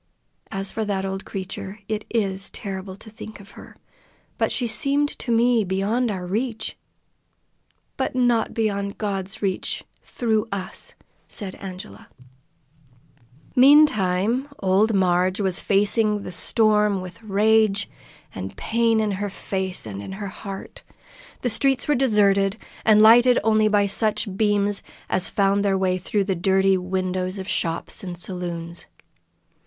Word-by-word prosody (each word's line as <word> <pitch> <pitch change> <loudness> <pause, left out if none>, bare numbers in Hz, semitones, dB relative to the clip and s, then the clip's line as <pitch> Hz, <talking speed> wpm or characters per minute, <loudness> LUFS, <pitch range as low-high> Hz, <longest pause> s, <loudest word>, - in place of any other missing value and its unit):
As 195 0 -3
for 220 - -2
that 195 -2 -2
old 195 0 -4
creature, 190 +1 -6
it 215 -1 -3
is 195 -4 0
terrible 190 -2 -6
to 220 +2 -13
think 220 -1 -10
of 200 0 -14
her, - - -13 0.6
but - - +1
she 245 - -1
seemed 280 +6 +1
to 240 - -3
me 235 0 +3
beyond 205 +6 0
our 185 -3 -4
reach." 220 +3 -3 1.2
"But 265 -2 -2
not 245 -3 +2
beyond 200 -3 -2
God's 195 -1 -4
reach 190 -2 -2 0.2
through 220 -3 -1
us!" 195 -2 -2 0.3
said 195 -4 -3
Angela. 185 - -9 1.5
Meantime 250 -4 +4
old 200 +3 +2
Marg 185 0 +2
was 190 -3 0
facing 210 +1 +2
the - - -6
storm 210 +1 +2
with 180 0 -9
rage 215 0 +2 0.5
and 95 0 -7
pain 230 0 +1
in 215 -1 0
her 200 +1 -3
face 190 - -2
and 100 -2 -6
in 190 - -7
her 200 0 -5
heart. 195 -1 -9 0.6
The 245 - +1
streets 270 +3 +1
were 295 - +3
deserted, 205 -6 +3 0.3
and 215 -1 +6
lighted 240 +3 +7
only 215 0 +3
by 205 -1 +3
such 210 0 0
beams 205 -1 +1 0.3
as 185 - +2
found 200 0 +2
their 195 -1 +2
way 185 -1 0
through 200 +3 0
the 195 0 -1
dirty 190 +2 +3
windows 185 0 -2
of 190 -1 -6
shops 165 +3 -2
and 180 -2 -6
saloons. 170 -2 -6
200 Hz, 140 wpm, -23 LUFS, 190-220 Hz, 1.5 s, lighted